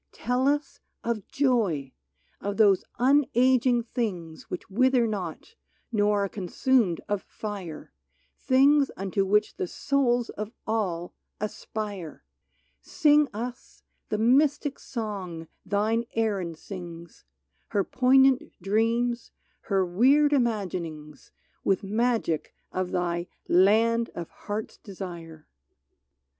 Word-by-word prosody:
Tell 250 Hz, +2 st, 0 dB
us 290 Hz, 0 st, 0 dB, 0.2 s
of 230 Hz, -4 st, -2 dB
joy 210 Hz, -, +1 dB, 0.2 s
— -, -, -40 dB
of 205 Hz, 0 st, -3 dB
those 200 Hz, -4 st, +5 dB, 0.2 s
unaging 255 Hz, -2 st, +3 dB
things 180 Hz, -10 st, -4 dB
Which -, -, -5 dB
wither 255 Hz, +3 st, +3 dB
not, 200 Hz, -, -5 dB, 0.4 s
nor 205 Hz, -2 st, +2 dB
are -, -, 0 dB
consumed 195 Hz, +1 st, +1 dB
of 205 Hz, -2 st, -1 dB
fire, 195 Hz, -7 st, -7 dB, 0.4 s
Things 275 Hz, +2 st, +4 dB
unto 195 Hz, 0 st, 0 dB
which 210 Hz, +2 st, +2 dB
the 185 Hz, -, -2 dB
souls 245 Hz, 0 st, +1 dB
of 210 Hz, 0 st, -5 dB, 0.2 s
all 185 Hz, -6 st, -2 dB, 0.3 s
aspire! 205 Hz, -4 st, -5 dB, 0.6 s
Sing 300 Hz, -3 st, +4 dB
us 240 Hz, +4 st, -7 dB, 0.3 s
the 215 Hz, -, 0 dB
mystic 280 Hz, +5 st, +2 dB
song 195 Hz, -8 st, -5 dB, 0.2 s
thine 215 Hz, +4 st, +1 dB
Erin 200 Hz, -7 st, -1 dB
sings, 170 Hz, -1 st, -9 dB, 0.4 s
Her 200 Hz, -, +1 dB
poignant 265 Hz, +2 st, +3 dB
dreams, 230 Hz, +4 st, 0 dB, 0.4 s
her 195 Hz, -3 st, +2 dB
weird 270 Hz, +11 st, +4 dB
imaginings. 175 Hz, -, -2 dB, 0.3 s
With 195 Hz, +1 st, +1 dB
magic 220 Hz, -5 st, 0 dB, 0.2 s
of 185 Hz, -1 st, -2 dB
thy 175 Hz, -1 st, -1 dB
" -, -, -53 dB
Land 225 Hz, +5 st, +4 dB
of 170 Hz, -1 st, -6 dB
Heart's 210 Hz, +1 st, -6 dB
Desire 170 Hz, -5 st, -9 dB
215 Hz, 110 wpm, -27 LUFS, 185-245 Hz, 0.6 s, those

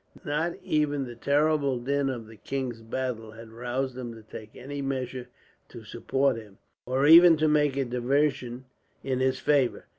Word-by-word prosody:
Not 155 Hz, +4 st, -1 dB
even 145 Hz, -2 st, 0 dB
the 120 Hz, -, -8 dB
terrible 140 Hz, +1 st, +1 dB
din 140 Hz, +3 st, 0 dB
of 120 Hz, -4 st, -5 dB
the 110 Hz, +1 st, -14 dB
king's 125 Hz, -1 st, -4 dB
battle 115 Hz, -1 st, -4 dB
had 110 Hz, 0 st, -12 dB
roused 125 Hz, +3 st, -3 dB
him 120 Hz, -2 st, -6 dB
to 110 Hz, -, -13 dB
take 110 Hz, 0 st, -11 dB
any 140 Hz, +2 st, -6 dB
measure 130 Hz, -2 st, -4 dB, 0.4 s
to -, -, -11 dB
support 135 Hz, -2 st, 0 dB
him, 105 Hz, -3 st, -12 dB, 0.3 s
or 130 Hz, +2 st, +1 dB
even 165 Hz, +1 st, +9 dB
to 155 Hz, +1 st, +2 dB
make 150 Hz, -2 st, +2 dB
a 135 Hz, -, +1 dB
diversion 125 Hz, 0 st, -1 dB, 0.4 s
in 130 Hz, -2 st, -1 dB
his 130 Hz, 0 st, +1 dB
favour. 140 Hz, -4 st, +1 dB
130 Hz, 170 wpm, -27 LUFS, 120-145 Hz, 0.4 s, even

